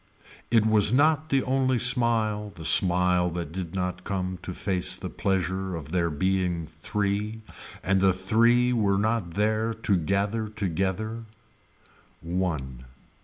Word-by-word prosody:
It 115 -2 +3
was 110 -2 +5
not 155 +4 +2
the 135 -1 +2
only 130 -1 +1
smile 115 -4 +1
the 80 - -8
smile 90 0 +4
that 85 -2 -5
did 90 0 -5
not 90 -1 -3
come 95 -2 -3
to - - -6
face 90 0 -1
the - - -7
pleasure 95 -1 -2
of 80 -2 -8
there 85 -1 +1
being 90 0 -1
three 105 +2 -2 0.4
and 95 0 +1
the 95 -1 +5
three 115 +6 +2
were 100 -4 +1
not 105 -5 -1
there 110 +2 0
to 105 -3 0
gather 100 +6 -1
together. 105 +3 -3 0.9
One. 80 -8 -3
95 Hz, 135 wpm, -26 LUFS, 90-110 Hz, 0.9 s, was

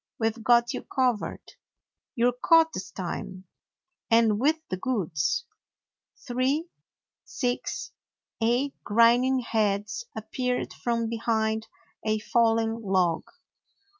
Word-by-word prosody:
We 225 -1 +2
've 225 0 -13
got 240 0 +4
you - - -4
covered. 250 -5 -1 0.7
You 240 -1 +3
're 245 - -6
caught 325 -1 +5
this 185 0 -5
time; 185 0 -6 0.7
and 225 -2 +4
with 300 +6 +3
the 185 - -2
goods." 195 - -1 0.8
Three, 265 +6 0 0.6
six, 245 -2 -3 0.5
eight 245 +5 +1
grinning 240 +4 +4
heads 215 - -1
appeared 250 +3 -2
from 230 -1 -1
behind 220 -1 -1 0.4
a 215 0 +1
fallen 225 0 +1
log. 185 -5 +1
230 Hz, 105 wpm, -27 LUFS, 215-250 Hz, 0.8 s, caught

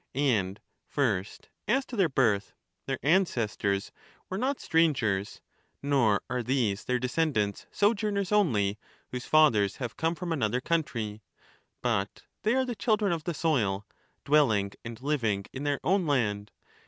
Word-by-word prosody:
And 105 -9 +1 0.3
first 110 -9 -1 0.2
as 260 +4 +2
to 245 - -8
their 190 -6 +3
birth. 110 -7 +1 0.3
Their 135 -1 -1
ancestors 115 - +1 0.4
were 190 - -2
not 265 +3 0
strangers, 120 -12 +1 0.4
nor 125 -8 +2
are 125 0 -1
these 115 -5 0
their 125 - +1
descendants 125 -5 -1
sojourners 205 -2 +1
only, 110 - +2 0.3
whose 125 0 -5
fathers 115 -11 +4
have 120 -4 -5
come 165 +2 0
from 170 +1 -3
another 125 -4 0
country; 115 -9 -2 0.6
but 110 -5 -1 0.2
they 215 +3 +2
are 260 0 +2
the 245 - -3
children 215 -3 +1
of 165 -3 -2
the 175 - -2
soil, 110 - 0 0.4
dwelling 115 -10 +3
and 115 -1 -7
living 115 -9 0
in 135 +2 -5
their 145 -1 0
own 185 -1 +2
land. 105 -7 0
130 Hz, 140 wpm, -28 LUFS, 105-165 Hz, 0.6 s, fathers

